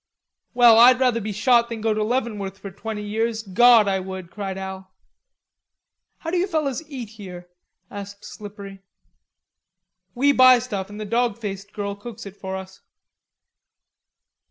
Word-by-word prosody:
"Well, 235 -2 +7
I'd 250 +2 +7
rather 250 -3 +2
be 215 +1 -4
shot 235 +3 +3
than 230 -1 -5
go 220 0 0
to 215 0 -1
Leavenworth 210 -5 -2
for 200 -1 -9
twenty 210 +2 -6
years, 220 +2 -2
Gawd! 225 +2 +5
I 195 -1 +1
would," 185 -2 -8
cried 195 -2 -5
Al. 190 0 -7 1.3
"How 325 - -6
do 360 - 0
you 360 +2 +1
fellers 305 -6 -1
eat 250 -7 -7
here?" 185 -5 -10 0.4
asked 200 0 -9
Slippery. 200 -2 -10 1.3
"We 280 +4 +3
buy 255 -2 +7
stuff 210 -6 -5
an' 205 - -10
the 215 - -5
dawg 230 0 0
faced 200 -2 -6
girl 200 -1 -4
cooks 220 +2 -10
it 200 -1 -10
for 190 -1 -6
us." 190 0 -9
210 Hz, 155 wpm, -23 LUFS, 195-240 Hz, 1.3 s, Well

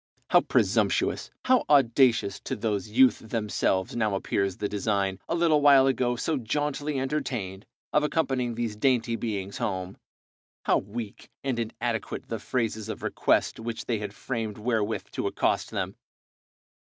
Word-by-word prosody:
How - - +7
presumptuous, - - +1 0.2
how 255 -1 +4
audacious, 120 -6 +4
to 130 - -2
those 105 -2 -2
youth 130 +4 +5
themselves 105 -4 -1
now 110 -4 +1
appears 95 -1 -1
the 105 - -1
design, 100 -2 -1
a - - +1
little 165 -3 +3
while 140 -2 +7
ago 125 -2 +1
so 150 +5 -1
jauntily 145 +3 -2
entertained, 120 -9 -3 0.3
of 150 - +4
accompanying 135 -6 0
these 115 -2 -2
dainty 115 0 +2
beings 100 -4 -4
home, 95 -1 -3 0.7
how - - +3
weak 105 +2 -7
and 130 -3 -1
inadequate 115 0 -3
the 115 - -3
phrases 110 -2 -2
of - - -6
request - - +1
which 115 0 -5
they 115 -3 -1
had 105 -1 -5
framed 115 -5 -4
wherewith 110 -1 -1
to - - -2
accost - - 0
them! - - -3
115 Hz, 145 wpm, -27 LUFS, 105-130 Hz, 0.7 s, How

